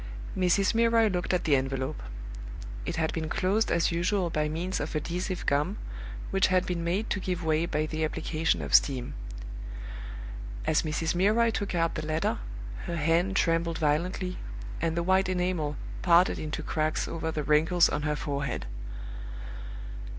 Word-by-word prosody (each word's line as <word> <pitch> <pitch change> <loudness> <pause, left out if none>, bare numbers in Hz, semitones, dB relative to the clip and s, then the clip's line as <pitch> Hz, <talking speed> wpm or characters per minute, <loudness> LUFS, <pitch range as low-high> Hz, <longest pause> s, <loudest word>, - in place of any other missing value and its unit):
Mrs. 185 +1 +3
Milroy 230 -1 +4
looked 180 -2 -1
at 180 - +1
the 150 -4 +4
envelope. 135 +2 -1 0.9
It - - -1
had 160 -1 0
been 160 -1 -2
closed 200 +7 +2
as 170 0 +3
usual 175 +1 +1
by 150 -1 +1
means 175 +4 -2
of 150 +2 -3
adhesive 180 +4 -2
gum, 145 +1 +1 0.5
which 195 - +4
had 185 0 +3
been 175 -2 -2
made 185 +6 0
to 205 - +1
give 180 -2 -2
way 160 +1 +2
by 155 -2 0
the 155 0 -2
application 160 +1 0
of - - -5
steam. 130 -3 +4 1.5
As 155 - +3
Mrs. 160 +1 0
Milroy 215 +6 +4
took 200 -3 -2
out 165 -1 +2
the 155 - -3
letter, 155 +1 0 0.5
her 170 - -2
hand 170 +5 +2
trembled 165 -2 +2
violently, 180 +5 0 0.4
and 165 0 0
the 170 - +2
white 190 +1 +3
enamel 180 -5 0 0.2
parted 175 0 +5
into 155 0 -3
cracks 155 0 0
over 160 -1 -2
the 155 -1 -2
wrinkles 160 +4 +5
on - - -1
her 150 0 0
forehead. 140 -2 -2
170 Hz, 160 wpm, -29 LUFS, 155-185 Hz, 1.5 s, parted